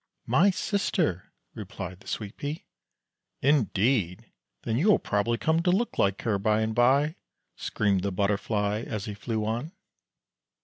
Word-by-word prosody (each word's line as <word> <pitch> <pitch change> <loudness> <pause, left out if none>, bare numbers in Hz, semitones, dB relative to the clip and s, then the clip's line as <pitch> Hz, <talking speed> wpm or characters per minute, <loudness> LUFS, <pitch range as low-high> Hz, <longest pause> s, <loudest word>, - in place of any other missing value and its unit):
" - - -52
My 195 +4 +6
sister," 185 - -1 0.2
replied 90 +1 -7
the 110 - -18
Sweet 105 -1 -4
pea. 145 +2 -5 0.8
"Indeed! 115 - +1 0.3
then 115 - -1
you 175 - +2
will 210 - +6
probably 110 +3 0
come 160 +6 +1
to 180 - +1
look 205 +7 0
like 100 0 +1
her, 105 -4 +1
by 105 +2 +2
and 110 0 -1
by," 140 - +3 0.4
screamed 100 -3 0
the 100 +1 -1
Butterfly 105 +2 0
as 110 -2 -4
he 105 - -5
flew 110 +1 -3
on. 120 - -3
110 Hz, 150 wpm, -27 LUFS, 100-145 Hz, 0.8 s, My